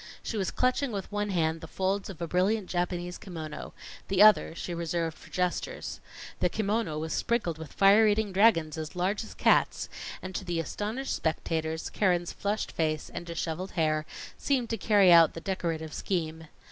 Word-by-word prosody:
She - - -4
was 195 -4 0
clutching 255 +1 +1
with 200 -2 -5
one 205 0 -1
hand 160 -3 0
the 165 - -8
folds 195 +4 -1
of 175 -3 -6
a - - -2
brilliant 190 +4 +1
Japanese 175 0 -2
kimono, 165 -6 -7 0.4
the 195 +1 +5
other 215 -5 +6
she 175 - -5
reserved 170 -1 -2
for - - -16
gestures. 180 - -2 0.4
The 180 - +2
kimono 210 -5 -1
was 160 0 -3
sprinkled 190 -9 0
with 160 -3 -8
fire 200 +3 +6
eating 210 -1 +1
dragons 185 -6 +3
as 155 +3 -6
large 190 +5 0
as - - -11
cats; - - +2 0.3
and 185 0 -7
to 195 - -3
the 175 -2 -2
astonished 215 - -3
spectators, 160 0 -2
Keren's 175 -4 +1
flushed 205 +2 -2
face 155 -2 -1
and 170 - -6
disheveled 170 +2 -4
hair 155 -2 +1 0.3
seemed 255 -5 0
to - - +1
carry 200 -3 +5
out 165 -2 +7
the - - -4
decorative 165 -5 -3
scheme. 160 -3 -3
180 Hz, 175 wpm, -29 LUFS, 165-205 Hz, 0.4 s, out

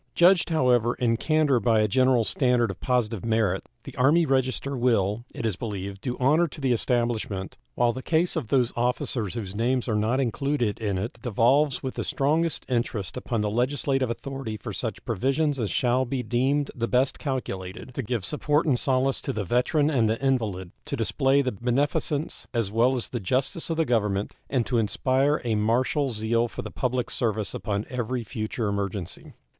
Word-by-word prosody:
Judged, 175 0 +5
however, 125 -7 +3
in 115 -2 +1
candor 150 0 +2
by 110 0 +3
a 105 - +3
general 130 +2 +3
standard 125 -2 +2
of 90 - -10
positive 120 -5 0
merit, 110 -5 0
the - - -10
Army 150 +7 +4
Register 135 0 0
will, 115 -3 +1
it - - -5
is 110 -5 0
believed, 100 -2 -5
do 125 -1 -3
honor 155 +7 +4
to 155 - -10
the 135 -3 +1
establishment, 115 -5 -1 0.2
while 120 -1 +2
the 130 - -6
case 165 +5 +1
of - - -2
those 125 -1 +2
officers 120 -4 -1
whose 100 -5 -5
names 125 +3 0
are 115 - 0
not 110 +5 +1
included 135 -3 0
in 100 -4 -1
it 110 +5 -4
devolves 125 +5 +2
with 130 - -3
the - - -3
strongest 155 +3 0
interest 115 -6 -2
upon 120 -3 -2
the 105 - 0
legislative 135 +2 0
authority 125 -2 -5
for - - -7
such - - -4
provisions 135 +5 0
as 110 -4 -1
shall 125 +1 +2
be 130 0 -3
deemed 135 +4 +1
the 115 -1 -2
best 130 +2 +1
calculated 115 -5 -4
to 135 - -2
give 115 -3 -3
support 150 0 +1
and 135 -6 +2
solace 135 -2 +1
to - - -3
the 110 -5 -2
veteran 145 - +2
and 115 -6 +2
the 110 - 0
invalid, 110 -10 -1
to - - -4
display 135 +1 +2
the 130 - -1
beneficence 140 - -1
as 115 -4 0
well 120 +4 +3
as 120 - -1
the 120 - -3
justice 130 - -1
of 165 - -1
the 165 - +2
Government, 105 -5 0
and 125 -4 +1
to 120 -2 +1
inspire 130 +7 +1
a 115 - +1
martial 125 +7 +1
zeal 115 +1 0
for - - -7
the - - -7
public 125 -1 -1
service 110 -4 -1
upon 105 -1 -2
every 125 -1 -3
future 110 +1 -3
emergency. 100 -3 -4
125 Hz, 185 wpm, -26 LUFS, 110-135 Hz, 0.2 s, Judged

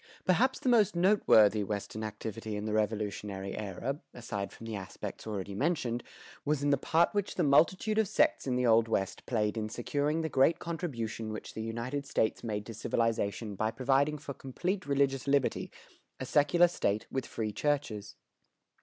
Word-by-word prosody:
Perhaps 250 +9 +2
the - - -3
most 220 -7 +4
noteworthy 110 - +5
Western 105 +2 -4
activity 110 0 -5
in 105 +1 -4
the 110 - -2
Revolutionary 105 -2 -2
era, 110 +7 -4 0.2
aside 105 -4 -4
from 115 - -11
the 115 -1 -4
aspects 95 +2 -7
already 100 -2 -4
mentioned, 125 - 0 0.4
was 145 -1 0
in 145 - +3
the 140 - +4
part 165 +5 +2
which 205 -1 -1
the - - +1
multitude 185 +9 +3
of 220 - +3
sects 300 - +2
in 125 - +1
the 125 0 +1
Old 115 -1 +5
West 95 -4 -1
played 110 -2 0
in 110 -1 -2
securing 145 +7 -1
the 160 - -1
great 150 +3 +3
contribution 120 -11 -4
which 110 - -7
the 110 - -5
United 120 +5 -3
States 110 - 0
made 105 -3 -3
to 115 - -7
civilization 110 -1 -1
by 110 +3 0
providing 135 +6 +1
for 145 -1 -7
complete 175 +8 -3
religious 140 -1 +1
liberty, 140 -2 +1 0.5
a 130 - -3
secular 150 +6 +4
state 110 -11 -1
with 130 -2 -2
free 110 -2 -3
churches. 135 -6 -2
120 Hz, 170 wpm, -31 LUFS, 110-150 Hz, 0.5 s, noteworthy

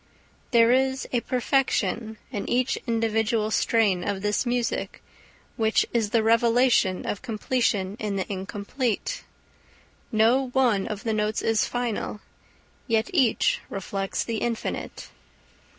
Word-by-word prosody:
There 230 -1 +5
is 265 +1 +1
a 245 - +2
perfection 235 -4 0
in 205 -6 -4
each 255 +2 +1
individual 225 -1 +1
strain 210 -6 +2
of 195 +1 -3
this 210 +4 0
music, 240 -1 -1 0.6
which 220 -1 +2
is 225 -3 +1
the 225 0 +2
revelation 230 -3 +3
of 205 - -3
completion 215 -3 -1
in 210 -2 -2
the 190 - -1
incomplete. 210 - -3 0.9
No 235 +4 +3
one 235 -7 +2
of 210 -3 -5
its 225 - 0
notes 210 0 -1
is 225 -1 +2
final, 240 -3 -3 0.7
yet 225 - +1
each 260 -10 +2
reflects 195 0 -3
the 230 -1 -3
infinite. 230 0 -4
225 Hz, 120 wpm, -25 LUFS, 210-245 Hz, 0.9 s, There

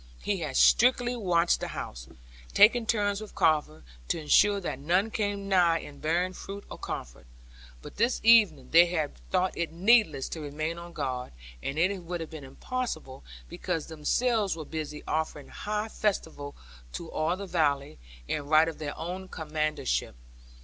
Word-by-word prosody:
He 205 - 0
had 150 -5 -3
strictly 245 0 +4
watched 175 -6 +2
the - - -4
house, - - -7 0.5
taking 230 +1 +6
turns 205 -2 +1
with 215 - -10
Carver, 155 -1 +1 0.2
to - - -1
ensure 200 +6 +4
that 175 -8 -4
none 180 +9 +1
came 205 -2 -2
nigh 175 -4 +4
it 145 -1 -12
bearing 175 +4 0
food 200 +2 -8
or - - -8
comfort. - - -7 0.6
But - - -11
this 235 +4 +2
evening, 210 - +5
they 170 +2 +7
had 160 -4 -1 0.2
thought 185 0 +1
it 170 -1 -2
needless 185 - +3
to 160 - -6
remain 155 +3 -4
on 170 0 -10
guard; 130 - -4 0.3
and 135 - -4
it 185 +5 +2
would 175 0 -5
have 165 0 -7
been 155 -3 -8
impossible, 135 - -5 0.2
because 165 - -3
themselves 200 +7 0
were 160 -2 -7
busy 150 -1 -6
offering 155 -2 -2
high 210 +1 -3
festival 160 -10 -2 0.4
to 165 - -6
all 165 +4 0
the 200 - -6
valley, 145 - 0 0.3
in 145 -1 -3
right 155 +2 +5
of 165 - -5
their 145 -2 -5
own 180 +4 -5
commandership. 155 - -2
170 Hz, 165 wpm, -28 LUFS, 150-200 Hz, 0.6 s, they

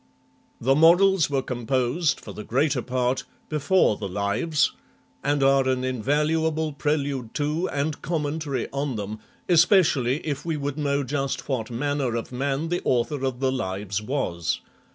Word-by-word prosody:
The 135 +3 +3
Morals 175 +3 +5
were 135 -2 0
composed, 130 +6 0
for - - -9
the 105 - -7
greater 135 +3 +1
part, 125 +1 -1 0.3
before 155 - +2
the 100 - -4
Lives, 100 - +1 0.5
and 145 0 +1
are 135 -1 +4
an 130 -1 0
invaluable 150 +5 0
prelude 140 -5 -2
to 155 +5 0
and 145 +1 -2
commentary 150 -4 -2
on 140 -2 -2
them, 105 +1 -5 0.3
especially 165 - +4
if 145 -3 -3
we 165 -2 -2
would 145 0 -2
xii 150 - -8
INTRODUCTION 140 -1 +1
know 140 - -1 0.2
just 135 - -4
what 130 -5 -2
manner 135 0 -1
of 115 - -4
man 140 +5 -1
the 175 +1 -1
author 125 +3 0
of 130 -1 -2
the 130 -1 +2
Lives 100 -4 -3
was. 105 - -2
140 Hz, 155 wpm, -25 LUFS, 125-150 Hz, 0.5 s, Morals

